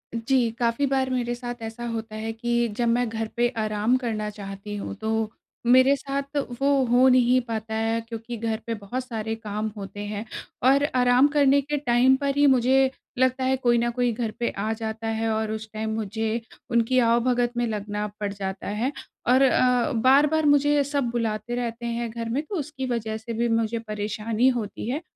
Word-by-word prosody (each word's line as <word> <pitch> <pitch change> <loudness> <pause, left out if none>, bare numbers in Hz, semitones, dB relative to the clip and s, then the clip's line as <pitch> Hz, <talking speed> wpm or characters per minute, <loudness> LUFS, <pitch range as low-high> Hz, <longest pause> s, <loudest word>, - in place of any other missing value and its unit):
जी, 235 +1 +2
काफ़ी 235 +4 +1
बार 265 -1 +1
मेरे 245 -2 -1
साथ 240 0 -7
ऐसा 225 +2 -6
होता 220 -1 -5
है 220 +1 -3
कि, 235 +1 0
जब 240 - +1
मैं 240 +1 +2
घर 225 0 -3
पे 240 0 +4
आराम 215 +2 +1
करना 220 -4 -3
चाहती 200 0 -7
हूँ, 200 - -5
तो 220 +1 -1 0.3
मेरे 260 +3 +6
साथ 280 +1 -4 0.2
वो 275 -1 +3
हो 245 +2 +5
नहीं 255 0 +5
पाता 220 -2 -4
है 225 +1 0
क्योंकि 230 +1 -6
घर 225 0 -1
पे 230 - -1
बहुत 220 +5 -5
सारे 225 -2 -3
काम 215 -1 -4
होते 200 0 -7
हैं। 210 +1 -4 0.4
और 280 +1 +4
आराम 250 +2 +5
करने 280 -1 +5
के 295 +2 -2
टाइम 255 -1 +4
पर 280 -1 0
ही 290 - +5
मुझे 265 +1 +4 0.3
लगता 260 0 +2
है 260 +1 +2
कोई 240 -2 +2
ना 235 +1 +1
कोई 245 0 0
घर 225 -1 -2
पे 240 - +1
आ 210 +2 -1
जाता 220 0 -5
है 225 0 -1
और 220 0 -1
उस 220 0 -5
टाइम 220 0 -3
मुझे 220 +2 -2 0.3
उनकी 235 +2 +3
आवभगत 240 +1 +2
में 240 - +1
लगना 210 -1 -3
पड़ 205 -1 -2
जाता 195 -1 -5
है। 220 +6 -1 0.4
और 255 +2 +5
अ, 255 0 +3
बार-बार 285 +6 +4
मुझे 290 0 +4
सब 280 -3 -1
बुलाते 230 0 -2
रहते 235 -1 -4
हैं 235 0 -2
घर 230 0 -5
में, 255 +5 0
तो 395 +6 -6
उसकी 285 -4 -4
वजह 225 -3 -2
से 225 +1 -7
भी 235 +1 0
मुझे 225 0 0
परेशानी 215 +2 -1
होती 215 0 -5
है। 285 +6 -2
235 Hz, 195 wpm, -25 LUFS, 220-255 Hz, 0.4 s, मेरे